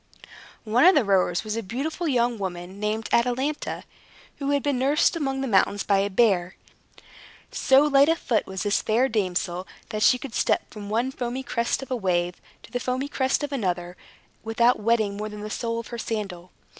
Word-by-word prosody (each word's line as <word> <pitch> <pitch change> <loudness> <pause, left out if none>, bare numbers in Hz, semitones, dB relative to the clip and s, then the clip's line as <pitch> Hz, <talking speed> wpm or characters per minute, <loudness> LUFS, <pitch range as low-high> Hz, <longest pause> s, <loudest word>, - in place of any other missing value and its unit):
One 225 +3 +2
of 370 +2 +7
the 280 -7 +3
rowers 185 -2 +2
was 215 0 -3
a 230 - -2
beautiful 280 - -3
young 240 -4 +1
woman, 185 0 -5
named 215 +1 -2
Atalanta, 255 +5 0 0.5
who 280 -1 -3
had 285 -1 +1
been 285 -3 0
nursed 280 +6 +3
among 270 -4 -2
the 270 - -2
mountains 200 -1 +2
by 200 -1 +2
a 200 +1 0
bear. 190 -4 +2 1.0
So 270 +2 +4
light 285 0 +5
of 330 - +3
foot 230 -8 0
was 190 -1 -4
this 205 -1 +1
fair 235 +5 +2
damsel, 185 -4 -2 0.2
that 215 -2 -4
she 250 - +5
could 250 -2 -8
step - - +1
from 205 -2 -8
one 235 +5 0
foamy 255 0 -4
crest 235 0 -1
of 265 - -11
a - - +1
wave 180 -5 -1 0.2
to - - -15
the 245 - -2
foamy 255 +3 -2
crest 265 +1 0
of 290 - -3
another, 180 -8 -2 0.5
without 235 +2 +2
wetting 215 -2 +1
more 215 +1 -4
than 210 0 -8
the 210 0 -6
sole 230 0 -2
of 230 - -8
her 235 - -6
sandal. 195 -6 -4
230 Hz, 195 wpm, -25 LUFS, 200-265 Hz, 1.0 s, of